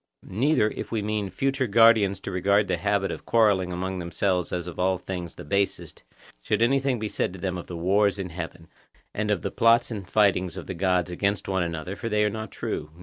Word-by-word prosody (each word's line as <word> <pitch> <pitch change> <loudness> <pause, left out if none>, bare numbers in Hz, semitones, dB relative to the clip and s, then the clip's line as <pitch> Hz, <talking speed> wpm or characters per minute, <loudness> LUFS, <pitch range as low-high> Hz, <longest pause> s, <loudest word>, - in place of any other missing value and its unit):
Neither, 110 +1 +2
if - - -7
we 110 -3 -1
mean 105 -1 -1
our - - -6
future 135 +7 -1
guardians 105 -3 +5
to - - -5
regard 100 +2 +2
the 90 - 0
habit 100 +2 0
of - - -8
quarrelling 100 -6 +3
among 95 +1 -3
themselves 90 +1 -1
as 90 -1 -2
of 90 -2 -8
all 95 +1 +2
things 90 -2 -6
the - - -9
basest, 100 0 -2 0.4
should 115 - +1
any 135 +4 +3
word 135 -2 0
be 110 - -2
said 95 - -2
to 95 - -9
them 95 0 -2
of 90 - -7
the 85 - -6
wars 100 +4 +2
in 95 -3 -5
heaven, 85 0 -7 0.5
and 105 0 -2
of 105 -4 0
the - - -2
plots 115 +1 +3
and 100 -5 -6
fightings 95 -4 +2
of - - -6
the - - -5
gods 90 0 0
against 100 +3 -1
one 95 -1 0
another, 85 +2 -3
for 115 - -5
they 105 -1 +2
are 105 - +1
not 110 -1 -5
true. 75 - -4
95 Hz, 230 wpm, -25 LUFS, 90-105 Hz, 0.5 s, guardians